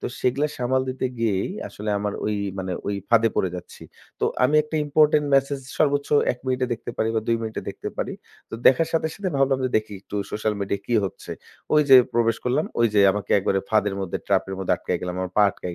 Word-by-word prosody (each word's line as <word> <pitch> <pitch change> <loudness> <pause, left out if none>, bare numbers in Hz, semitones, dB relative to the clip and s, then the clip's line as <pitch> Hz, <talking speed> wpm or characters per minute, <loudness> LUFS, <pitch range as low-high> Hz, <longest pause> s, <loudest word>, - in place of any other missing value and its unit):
তো - - -3
সেগুলা 135 +4 +1
সামাল 130 +1 +1
দিতে 130 0 -3
গিয়েই 105 -4 0 0.2
আসলে 105 +1 -5
আমার 105 0 -2
ওই 105 -1 0 0.2
মানে 95 -1 -3
ওই 100 - -1
ফাঁদে 115 -1 +4
পড়ে 95 - +1
যাচ্ছি। 90 - -11 0.4
তো - - +2 0.2
আমি 145 +4 +2
একটা 155 +1 -5
important 150 0 +4
message 135 0 +1 0.2
সর্বোচ্চ 145 -1 +2 0.2
১ 125 - -12
মিনিটে 130 0 0
দেখতে 115 - -5
পারি 110 - 0
বা - - +2
২ 115 - +3
মিনিটে 110 0 -4
দেখতে - - -5
পারি। - - -3 0.4
তো - - -5
দেখার 155 +5 +5
সাথে, 160 -1 +1
সাথে 195 -2 -3
ভাবলাম 135 -1 +2
যে 130 - 0
দেখি 110 -1 -2
একটু 105 - -7
সোশ্যাল 110 0 -1
মিডিয়ায় 100 0 -2
কী 120 - 0
হচ্ছে, 95 - -7 0.4
ওই 150 - +6
যে 130 - +11 0.2
প্রবেশ 115 -1 +2
করলাম, 130 +5 +1 0.2
ওই 115 - +5
যে 105 - +5
আমাকে 105 -2 -5
একবারে 95 0 +1
ফাঁদের 105 -2 +1
মধ্যে 95 -3 -3
trap - - +2
এর 95 - -4
মধ্যে 95 - 0
আটকায় 90 - -3
গেলাম, 90 0 -4
আমার 95 0 -4
পা, 105 - +6
আটকায় 90 -2 -7
115 Hz, 220 wpm, -23 LUFS, 100-135 Hz, 0.4 s, যে